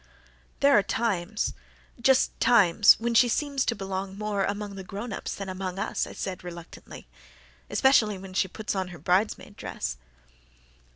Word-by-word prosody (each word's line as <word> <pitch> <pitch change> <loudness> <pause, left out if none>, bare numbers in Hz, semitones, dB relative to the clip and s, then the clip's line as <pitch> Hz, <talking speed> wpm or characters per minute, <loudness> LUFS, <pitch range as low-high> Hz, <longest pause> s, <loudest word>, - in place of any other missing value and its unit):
"There 280 0 +6
are 205 - +6
times 210 -1 -1 0.5
just 265 +2 +4
times 205 -3 +6
when 235 +1 -1
she 240 +1 +5
seems 280 +1 0
to 235 - 0
belong 195 -1 -5
more 210 -2 -1
among 205 0 -4
the 195 -1 -7
grown 205 +4 -6
ups - - -5
than 195 - -6
among 185 0 -5
us," 195 - -2
I - - -9
said, 185 -2 -5
reluctantly, 170 -1 -10 0.6
"especially 215 -2 +3
when 190 0 -10
she 190 - +1
puts 215 +3 -4
on 190 -2 -2
her 175 -1 -10
bridesmaid 200 +4 0
dress." - - -5
200 Hz, 160 wpm, -27 LUFS, 190-225 Hz, 0.6 s, There